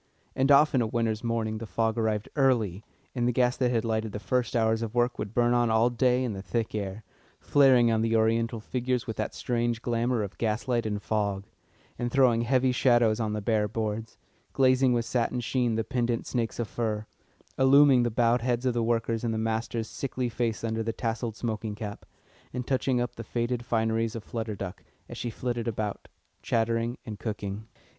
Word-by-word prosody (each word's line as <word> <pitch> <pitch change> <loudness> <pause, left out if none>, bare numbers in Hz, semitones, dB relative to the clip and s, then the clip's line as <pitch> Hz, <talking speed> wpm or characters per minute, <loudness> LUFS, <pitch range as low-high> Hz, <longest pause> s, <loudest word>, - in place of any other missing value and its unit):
And 135 +2 +2
often 140 -2 +5
of - - +1
a - - -7
winter's 115 -1 0
morning 115 -2 -1
the 115 - -6
fog 110 +4 0
arrived 110 -2 -1
early, 115 - +2 0.3
and 120 -2 0
the - - +3
gas 125 +1 +2
that 125 -2 +2
had 115 -2 0
lighted 110 -2 -1
the 105 - -4
first 125 +2 -1
hours 110 -1 +2
of 115 0 -4
work 120 0 +1
would 105 +1 -5
burn 120 0 +3
on 120 -1 +3
all 110 +2 +3
day 125 +1 +2
in 120 -4 -2
the 95 - -6
thick 115 +2 -2
air, 100 0 -4 0.4
flaring 130 -4 +5
on 110 -1 +2
the 115 0 +1
Oriental 115 +1 +1
figures 125 +2 -2
with 110 - -4
that - - -3
strange 120 -1 -1
glamour 120 -1 0
of 100 -1 -8
gas 110 +2 -1
light 120 -3 +1
in 105 -1 -1
fog, 100 -2 -1 0.6
and 120 0 -2
throwing 125 -4 +4
heavy 130 +2 +2
shadows 120 -3 +3
on 110 -2 -1
the 105 -1 -3
bare 105 -1 +1
boards; 110 +1 -4 0.4
glazing 130 -1 +4
with 120 -1 +1
satin 125 +1 0
sheen 120 -1 0
the 115 - 0
pendent 120 0 -1
snakes 115 -3 -2
of 120 - -2
fur, 110 -2 -2 0.5
illuming 135 -1 +6
the 120 - +1
bowed 120 +1 +2
heads 120 0 -1
of 125 - +2
the 120 - 0
workers 115 0 0
and 115 -2 -1
the - - -1
master's 110 0 -2
sickly 130 -2 -3
face 115 -1 -2
under 110 0 -1
the 115 +1 -1
tasselled 115 -1 -3
smoking 110 -2 -3
cap, 105 -1 -7 0.4
and 125 -1 -4
touching 130 -1 +1
up 120 0 -2
the 115 - -5
faded 120 +2 -2
fineries 115 -1 0
of 115 - -5
Flutter 110 -3 -4
Duck, 95 -2 -7 0.2
as - - -8
she 120 - -2
flitted 120 +1 -3
about, 105 -2 -3 0.3
chattering 115 +1 0
and 105 -2 -7
cooking. 105 -1 -5
115 Hz, 200 wpm, -28 LUFS, 110-120 Hz, 0.6 s, illuming